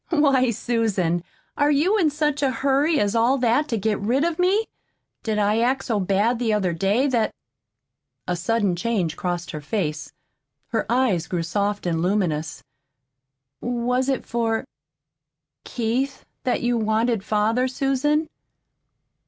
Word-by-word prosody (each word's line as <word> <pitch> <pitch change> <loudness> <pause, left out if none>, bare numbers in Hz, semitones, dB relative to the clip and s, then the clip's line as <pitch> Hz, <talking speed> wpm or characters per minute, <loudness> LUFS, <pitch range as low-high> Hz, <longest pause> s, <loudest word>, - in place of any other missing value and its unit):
"Why, 275 -6 +3
Susan, 210 -7 0 0.3
are 290 0 +2
you 305 +8 +3
in 325 -5 +3
such 295 -1 -1
a 275 - +3
hurry 275 +5 +1
as 205 0 +1
all 235 +4 +3
that 250 +4 +2
to 230 - -1
get 210 0 0
rid 245 +8 +1
of 340 0 -1
me? 390 +5 +3 0.6
Did 220 -2 -2
I 210 +1 +2
act 255 +3 +1
so 225 -5 0
bad 200 +5 +1
the 235 -3 0
other 190 -4 +1
day 195 +10 +1
that 240 -5 0 0.5
" - - -55
A 180 - 0
sudden 200 +1 0
change 185 -5 -1
crossed 175 -1 -3
her 155 - -6
face. 155 -2 -3 0.6
Her 225 -3 -1
eyes 235 -10 +1
grew 175 -2 -2
soft 205 +3 -1
and 165 -2 0
luminous. 170 -5 -1 1.0
"Was 245 +2 0
it 265 - -1
for 225 0 -1 1.0
Keith 250 +4 -2 0.2
that 250 - 0
you 240 -1 +1
wanted 220 0 +1
father, 220 +5 +1
Susan?" 275 +4 0
230 Hz, 145 wpm, -23 LUFS, 200-265 Hz, 1.0 s, Why